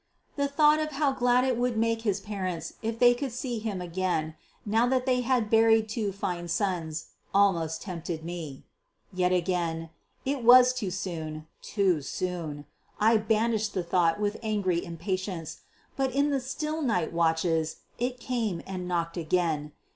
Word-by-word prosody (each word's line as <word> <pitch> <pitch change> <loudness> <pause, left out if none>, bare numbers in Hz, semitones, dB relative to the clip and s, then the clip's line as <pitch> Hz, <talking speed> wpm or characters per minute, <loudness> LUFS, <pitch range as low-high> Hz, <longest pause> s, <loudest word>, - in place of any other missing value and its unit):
The 280 -1 +1
thought 300 +2 +4
of 305 -1 -2
how 280 0 +2
glad 250 -1 +3
it 260 -1 +1
would 245 -1 0
make 225 0 +1
his 205 -4 0
parents 185 -5 -4
if 225 0 -2
they 245 0 +6
could 265 +1 -4
see 240 -1 -3
him 210 -4 -3
again, 175 -3 -1 0.3
now 225 +3 +3
that 255 0 +1
they 250 -1 +2
had 245 -3 +1
buried 225 -1 +5
two 210 -2 -1
fine 175 -3 -3
sons, 170 -4 -2 0.3
almost 170 -5 +2
tempted 170 -3 -5
me. 165 -6 -6 0.5
Yet 180 0 +1
again, 170 -3 -1 0.3
it 270 -2 -1
was 250 +1 +8
too 235 -7 -3
soon, 160 -5 -5 0.2
too 190 -7 +1
soon. 155 -2 -4 0.3
I 225 +2 +5
banished 215 0 0
the 185 - 0
thought 170 0 +2
with 205 0 -1
angry 200 -6 0
impatience. 185 -1 -4 0.4
But 265 -1 0
in 285 +1 +3
the 275 - +1
still 305 +5 -3
night 210 - 0
watches 165 -1 +1 0.2
it 250 +1 -2
came 230 -8 -2
and 185 -2 -5
knocked 170 -1 -1
again. 160 -3 0
200 Hz, 160 wpm, -28 LUFS, 170-245 Hz, 0.5 s, was